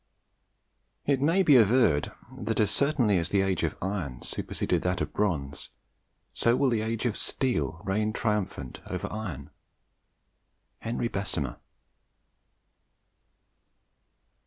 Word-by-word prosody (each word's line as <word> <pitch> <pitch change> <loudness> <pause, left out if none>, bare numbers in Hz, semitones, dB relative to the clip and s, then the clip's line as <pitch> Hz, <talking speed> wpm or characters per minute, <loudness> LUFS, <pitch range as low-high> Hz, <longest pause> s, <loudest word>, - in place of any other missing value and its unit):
"It 140 -2 +2
may 165 +7 +3
be 150 -5 +6
averred 110 - +4 0.2
that 115 -3 -2
as 105 - +3
certainly 130 - +2
as 85 - -2
the 100 - +3
age 95 -1 0
of - - -1
iron 90 -10 -3
superseded - - -2
that 90 0 0
of - - -3
bronze, 70 -9 -2 0.6
so 115 +1 +3
will 135 0 +3
the 115 -2 +1
age 115 +2 -2
of 115 -4 +1
steel 120 -10 -1
reign 105 +2 0
triumphant 105 - -2
over - - -3
iron." 80 -11 -5 1.3
HENRY 120 +1 -2
BESSEMER. 95 - -2
105 Hz, 115 wpm, -28 LUFS, 90-120 Hz, 1.3 s, be